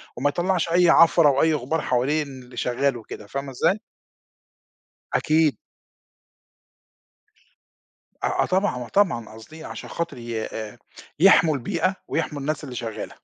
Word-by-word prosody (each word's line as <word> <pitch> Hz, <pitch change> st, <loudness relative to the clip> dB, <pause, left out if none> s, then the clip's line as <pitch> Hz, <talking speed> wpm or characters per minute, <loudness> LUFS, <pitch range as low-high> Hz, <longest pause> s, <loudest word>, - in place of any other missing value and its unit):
وما 145 Hz, +4 st, +1 dB
يطلّعش 175 Hz, +1 st, 0 dB
أي 175 Hz, 0 st, +4 dB
عفرة 165 Hz, -2 st, +6 dB
أو 135 Hz, 0 st, +2 dB
أي 160 Hz, -1 st, +3 dB
غبار 150 Hz, +3 st, -1 dB
حوالين 140 Hz, +4 st, 0 dB, 0.2 s
اللي 125 Hz, -1 st, -15 dB
شغال 125 Hz, +2 st, 0 dB
وكده، 105 Hz, -2 st, -10 dB
فاهمة 140 Hz, +2 st, -5 dB
إزاي؟ 175 Hz, -, +1 dB, 1.3 s
أكيد. 155 Hz, -1 st, +2 dB, 2.7 s
آه، -, -, +1 dB
آه -, -, 0 dB
طبعًا، 190 Hz, +2 st, +1 dB
آه -, -, -11 dB
طبعًا 170 Hz, -, +1 dB
قاصدين 155 Hz, +9 st, -12 dB
عشان -, -, -8 dB
خاطر 170 Hz, -6 st, -4 dB
ي 115 Hz, -2 st, -4 dB
آآ، 110 Hz, +2 st, -7 dB, 0.4 s
يحمُوا 170 Hz, -4 st, +6 dB
البيئة، 170 Hz, +8 st, -1 dB
ويحمُوا 150 Hz, -3 st, -2 dB
الناس 150 Hz, +2 st, -3 dB
اللي 130 Hz, -3 st, -8 dB
شغالة. 115 Hz, -2 st, -6 dB
150 Hz, 135 wpm, -23 LUFS, 125-165 Hz, 2.7 s, عفرة